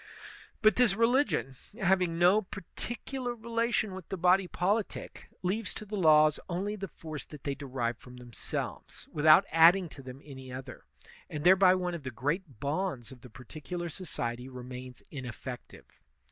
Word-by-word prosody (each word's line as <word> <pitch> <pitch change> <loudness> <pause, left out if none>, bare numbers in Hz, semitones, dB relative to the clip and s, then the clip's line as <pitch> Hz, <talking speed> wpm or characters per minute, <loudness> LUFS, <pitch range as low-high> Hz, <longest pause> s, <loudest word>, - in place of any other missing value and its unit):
But 215 - +5
this 240 -5 +4
religion, 230 - +2 0.3
having 185 -3 +2
no 180 +5 +5
particular 240 +6 -5
relation 230 -2 -1
with 185 -2 -9
the 190 - -3
body 180 +2 +4
politic, 200 +5 -2
leaves 200 +3 -1
to 215 - -7
the 210 +1 -5
laws 155 -4 +5
only 195 +4 -2
the 195 -1 -5
force 155 -3 -8
that 150 -3 -12
they 140 - -1
derive 125 -4 -3
from 125 0 -13
themselves, 120 -2 -6
without 155 +1 +6
adding 170 +3 +6
to 140 - -11
them 130 0 -9
any 130 -3 -10
other; 130 0 -8 0.4
and 150 -1 -5
thereby 185 0 +7
one 180 -1 -2
of 170 - -5
the 130 - -5
great 140 - -3
bonds 140 - -2
of 125 -2 -13
the 125 - -12
partic 130 +6 -12
ular 175 -2 -3
society 125 -8 -4
remains 125 0 -9
ineflEective. 125 -2 -8
165 Hz, 160 wpm, -30 LUFS, 130-195 Hz, 0.4 s, thereby